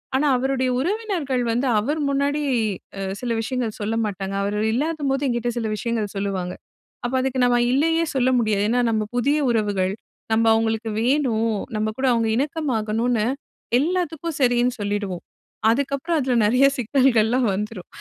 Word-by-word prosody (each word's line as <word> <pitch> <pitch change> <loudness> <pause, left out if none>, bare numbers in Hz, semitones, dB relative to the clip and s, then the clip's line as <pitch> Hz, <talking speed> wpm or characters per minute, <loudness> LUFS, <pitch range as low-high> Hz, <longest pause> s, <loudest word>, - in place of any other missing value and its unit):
ஆனா, 275 - +2
அவருடைய 260 0 0
உறவினர்கள் 345 - -1
வந்து 245 +3 0
அவர் 295 +9 -1
முன்னாடி 280 +2 0 0.6
அ - - -3 0.2
சில 240 -2 -2
விஷயங்கள் 235 -2 -3
சொல்ல 220 +2 -1
மாட்டாங்க. 195 -1 -4
அவர் 205 +1 -1 0.2
இல்லாதபோது 285 0 -1
என்கிட்ட 240 -1 -1
சில 225 - -2
விஷயங்கள் 215 -1 -2
சொல்லுவாங்க. 190 -2 -2 0.5
அப்ப 245 - -2
அதுக்கு 260 -1 -1
நம்ம 245 0 +3
இல்லயே 325 +4 +2
சொல்ல 260 0 +3
முடியாது. 210 -3 +1
ஏன்னா, 245 +1 +2
நம்ம 215 -1 +1
புதிய 285 +5 +2
உறவுகள் 200 -4 0 0.4
நம்ம 225 +1 +3
அவங்களுக்கு 225 0 0
வேணும். 230 -5 +1 0.2
நம்ம 215 0 0
கூட 265 - +1
அவங்க 230 -1 +1
இணக்கமாகணுனு, 240 -6 0 0.5
எல்லாத்துக்கும் 335 -1 -2
சரினு 245 0 +3
சொல்லிடுவோம். 205 -3 -3 0.5
அதுக்கப்புறம் 280 +6 0
அதில 260 -2 0
நெறைய 250 +6 +4
சிக்னல்கள் 250 -2 +3
எல்லாம் 250 +1 +1
வந்துரும். 210 -1 -5
245 Hz, 145 wpm, -22 LUFS, 215-275 Hz, 0.6 s, நெறைய